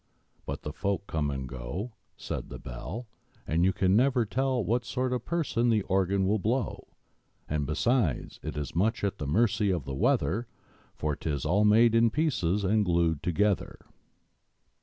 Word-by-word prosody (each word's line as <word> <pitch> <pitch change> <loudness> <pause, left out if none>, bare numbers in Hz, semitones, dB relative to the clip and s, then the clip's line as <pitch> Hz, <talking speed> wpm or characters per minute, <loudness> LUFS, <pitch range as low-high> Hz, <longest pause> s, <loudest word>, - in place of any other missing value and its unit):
But - - -4
the 75 - -5
folk 100 +2 -2
come 75 -5 -1
and 65 -2 -4
go, 65 - -5 0.2
Said - - -5
the - - -7
Bell, 70 - -7 0.4
And 80 +3 +1
you 95 - +4 0.2
never 120 +5 +3
can 105 - -17
tell 130 -4 +1
What 120 +6 +1
sort 125 +1 -1
of 125 -2 -3
person 135 -8 0
the 110 -3 +2
Organ 95 0 +1
will 105 +3 +2
blow! 115 +3 -1 0.6
And, 75 -2 -1
besides, 90 - 0
it 75 -1 -5
is 75 +1 -4
much 110 +6 +1
at 100 -1 -1
the 75 - -3
mercy 105 +4 +2
of 85 -8 -1
the 70 - -5
weather 105 - +1 0.5
For 75 -1 -1
'tis 75 -1 -3
all 100 +7 +3
made 110 +2 +5
in 115 0 +5
pieces 105 - 0
and 105 +2 +3
glued 85 -4 +1
together! 100 +3 0
100 Hz, 170 wpm, -28 LUFS, 80-115 Hz, 0.6 s, made